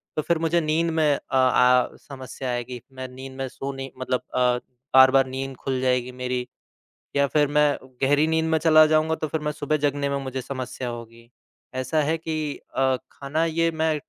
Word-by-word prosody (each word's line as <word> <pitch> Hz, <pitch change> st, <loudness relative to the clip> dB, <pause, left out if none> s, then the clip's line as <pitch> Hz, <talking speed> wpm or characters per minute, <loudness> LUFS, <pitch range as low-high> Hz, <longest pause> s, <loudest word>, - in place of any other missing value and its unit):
तो 155 Hz, -, +1 dB
फिर 170 Hz, +2 st, +1 dB
मुझे 165 Hz, +1 st, +1 dB
नींद 160 Hz, +2 st, +1 dB
में 155 Hz, -2 st, +3 dB
अ -, -, -6 dB
आ 125 Hz, -1 st, +4 dB
समस्या 130 Hz, -1 st, -8 dB
आएगी, 120 Hz, 0 st, -4 dB
मैं 130 Hz, 0 st, -6 dB
नींद 130 Hz, +1 st, -9 dB
में 135 Hz, 0 st, -3 dB
सो 135 Hz, +2 st, -5 dB
नहीं 135 Hz, 0 st, -7 dB
मतलब 130 Hz, -1 st, -1 dB
अ, -, -, +2 dB, 0.6 s
बार-बार 130 Hz, 0 st, +7 dB
नींद 135 Hz, +1 st, -5 dB
खुल 130 Hz, 0 st, -2 dB
जाएगी 125 Hz, -1 st, +1 dB
मेरी 125 Hz, 0 st, -3 dB, 0.7 s
या 140 Hz, 0 st, +4 dB
फिर 145 Hz, +1 st, +2 dB
मैं 150 Hz, -1 st, +5 dB, 0.3 s
गहरी 145 Hz, +3 st, +4 dB
नींद 160 Hz, 0 st, +1 dB
में 160 Hz, -, +3 dB
चला 155 Hz, 0 st, +6 dB
जाऊँगा 155 Hz, +1 st, +2 dB
तो 155 Hz, -, -3 dB
फिर 160 Hz, +2 st, -2 dB
मैं 150 Hz, 0 st, -2 dB
सुबह 150 Hz, +1 st, -1 dB
जगने 140 Hz, 0 st, -1 dB
में 140 Hz, -, -1 dB
मुझे 130 Hz, 0 st, -4 dB
समस्या 130 Hz, -1 st, -5 dB
होगी। 115 Hz, 0 st, -9 dB, 0.5 s
ऐसा 130 Hz, +4 st, 0 dB
है 155 Hz, +3 st, +1 dB
कि 155 Hz, -2 st, -3 dB, 0.2 s
अ, 130 Hz, -1 st, +3 dB, 0.2 s
खाना 145 Hz, +4 st, -1 dB
ये 165 Hz, 0 st, +1 dB
मैं 160 Hz, -1 st, 0 dB
135 Hz, 190 wpm, -24 LUFS, 130-155 Hz, 0.7 s, बार-बार